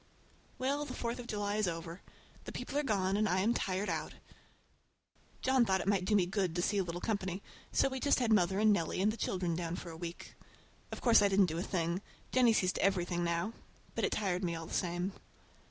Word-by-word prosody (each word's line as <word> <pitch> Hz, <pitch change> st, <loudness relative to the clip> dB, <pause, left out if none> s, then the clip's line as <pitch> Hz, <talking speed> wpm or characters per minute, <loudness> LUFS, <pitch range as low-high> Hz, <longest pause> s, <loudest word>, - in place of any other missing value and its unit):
Well, 280 Hz, +3 st, 0 dB
the 275 Hz, -4 st, -6 dB
Fourth 235 Hz, +1 st, -3 dB
of 240 Hz, -, -7 dB
July 205 Hz, -1 st, -1 dB
is 215 Hz, -3 st, +1 dB
over! 165 Hz, +1 st, -5 dB, 0.4 s
The -, -, -6 dB
people 280 Hz, -, -6 dB
are 295 Hz, -, +3 dB
gone 195 Hz, -8 st, +1 dB
and 210 Hz, 0 st, +2 dB
I 185 Hz, +1 st, +2 dB
am 225 Hz, +4 st, +3 dB
tired 195 Hz, -2 st, -1 dB
out. -, -, -3 dB, 1.3 s
John 260 Hz, -1 st, +4 dB
thought 190 Hz, -4 st, +2 dB
it 180 Hz, -, -4 dB
might 195 Hz, -2 st, +2 dB
do 210 Hz, -, +2 dB
me 190 Hz, -3 st, +4 dB
good 185 Hz, -2 st, -1 dB
to 175 Hz, -, +1 dB
see 205 Hz, +1 st, +1 dB
a -, -, +2 dB
little 175 Hz, 0 st, -4 dB
company, 190 Hz, -2 st, -2 dB, 0.3 s
so -, -, +3 dB
we 265 Hz, -1 st, -3 dB
just 285 Hz, -, +3 dB
had 235 Hz, -4 st, +2 dB
mother 190 Hz, -2 st, +3 dB
and 215 Hz, 0 st, +5 dB
Nellie 170 Hz, -2 st, -1 dB
and 205 Hz, +3 st, +3 dB
the -, -, -5 dB
children 180 Hz, -6 st, -1 dB
down 170 Hz, 0 st, -3 dB
for 175 Hz, -, -7 dB
a -, -, -8 dB
week. 170 Hz, +1 st, -7 dB, 0.6 s
Of -, -, -6 dB
course 235 Hz, -4 st, +6 dB
I 205 Hz, -, +5 dB
didn't 195 Hz, 0 st, +4 dB
do 165 Hz, -1 st, -3 dB
a -, -, 0 dB
thing. 175 Hz, -1 st, -1 dB, 0.3 s
Jennie 250 Hz, -2 st, +5 dB
sees 185 Hz, -4 st, +2 dB
to -, -, -3 dB
everything 175 Hz, -2 st, +1 dB
now. 170 Hz, +5 st, -1 dB, 0.4 s
But -, -, -2 dB
it -, -, +1 dB
tired 190 Hz, -3 st, -1 dB
me 170 Hz, -2 st, -1 dB
all 165 Hz, 0 st, -6 dB
the -, -, -9 dB
same. 175 Hz, +2 st, -1 dB
190 Hz, 235 wpm, -33 LUFS, 175-215 Hz, 1.3 s, course